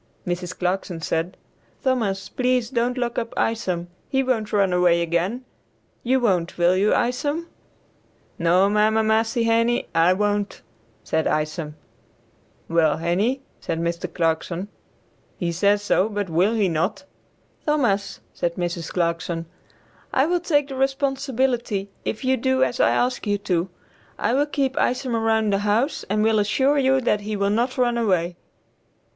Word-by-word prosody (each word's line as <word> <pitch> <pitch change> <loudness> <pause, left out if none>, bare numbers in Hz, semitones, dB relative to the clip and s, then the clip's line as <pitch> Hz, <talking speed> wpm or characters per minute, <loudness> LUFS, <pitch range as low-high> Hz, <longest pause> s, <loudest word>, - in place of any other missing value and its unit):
Mrs. 180 0 -3
Clarkson 180 -1 -2
said, 165 +3 -2 0.5
"Thomas, 225 -8 0
please 250 -2 0
don't 245 0 0
lock 240 -1 -1
up 230 -1 -6
Isom; 185 -6 -1 0.2
he 270 0 +1
won't 225 -5 -1
run 195 -3 +2
away 180 -1 +4
again. 170 +9 -1 0.6
You 260 +2 +2
won't, 185 -8 0
will 175 +1 +4
you 200 +3 +2
Isom?" 290 +7 0 0.9
"No, 180 +3 +4
mamma 215 +2 +3
massie 225 +2 +1
Henie, 230 +1 +2
I 165 +2 +4
won't," 205 +1 -1 0.4
said 160 - 0
Isom. 155 0 -2 0.9
"Yes, 160 -2 +2
Henie," 200 +11 0 0.2
said 165 - -3
Mr. 170 +1 -2
Clarkson, 170 +3 -1 0.7
"he 175 -2 -1
says 200 +4 +2
so, 205 0 +2
but 205 -4 -3
will 185 +8 +2
he 210 -3 +2
not?" 185 - -1 0.6
"Thomas," 240 -10 0
said 170 -1 -2
Mrs. 175 -2 -3
Clarkson, 170 -1 -1 0.7
"I 265 - +3
will 350 +2 +1
take 290 -5 +1
the 270 - -5
responsibility 265 -6 -1
if 230 - -3
you 260 0 +3
do 260 +1 +2
as 245 - -1
I - - +5
ask 245 -2 0
you 205 0 +2
to; 185 -3 -1 0.5
I 230 - 0
will 285 +3 +2
keep 275 -3 -1
Isom 250 -1 0
around 220 -2 +1
the 195 - +2
house 215 +8 0
and 210 +1 +1
will 220 -1 +3
assure 265 +8 +2
you 265 0 +3
that 210 -4 +1
he 210 +1 -4
will 200 0 +1
not 240 +5 0
run 240 -2 +2
away." 180 -6 +1
210 Hz, 150 wpm, -23 LUFS, 180-250 Hz, 0.9 s, I